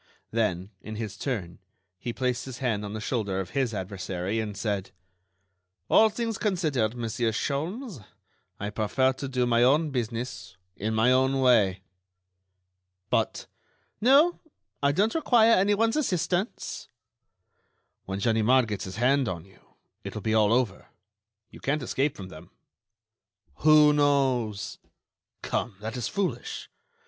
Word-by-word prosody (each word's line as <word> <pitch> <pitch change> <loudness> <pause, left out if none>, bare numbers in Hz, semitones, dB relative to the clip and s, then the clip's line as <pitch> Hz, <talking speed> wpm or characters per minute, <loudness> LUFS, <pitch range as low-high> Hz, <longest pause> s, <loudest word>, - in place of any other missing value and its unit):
Then, 100 -4 -1
in 110 - -7
his 105 -3 -5
turn, 100 -8 -4 0.4
he 120 - -4
placed 125 0 -2
his 130 -3 -7
hand 115 -6 -1
on 105 0 -5
the 110 - -4
shoulder 110 -5 -2
of 90 -2 -5
his 130 -4 0
adversary, 95 0 -3
and 105 -2 -4
said: 100 -3 -2 1.0
"All 220 - +7
things 225 0 -3
considered, 155 - 0
Monsieur 115 0 -1
Sholmes, 160 - -3 0.6
I 105 +1 -3
prefer 125 +5 +1
to 135 +1 -6
do 130 -2 0
my 120 -1 +3
own 145 +5 +4
business 115 -7 -4 0.2
in 110 +2 -2
my 115 +3 +4
own 130 +1 +3
way." 105 -8 +4 1.3
"But—" - - 0 0.6
"No, 285 +9 +5 0.4
I 140 0 +3
don't 205 +9 +1
require 235 -8 +4
anyone's 205 +3 +3
assistance." 190 - -1 1.2
"When 95 0 -4
Ganimard 115 +4 +3
gets 105 -3 -4
his 95 - -7
hand 130 +2 +2
on 85 -2 -5
you, 95 - -21 0.4
it - - -7
will 105 - -4
be 110 - 0
all 110 -1 +4
over. 115 -5 0 0.6
You - - -12
can't 140 +1 -1
escape 135 +3 -1
from 95 -2 -8
them." 80 -3 -12 1.1
"Who 150 -1 +6
knows?" 130 -8 +1 0.6
"Come, 115 -4 -2
that 110 +2 -5
is 125 - -2
foolish. 200 - -3
120 Hz, 135 wpm, -27 LUFS, 105-145 Hz, 1.3 s, All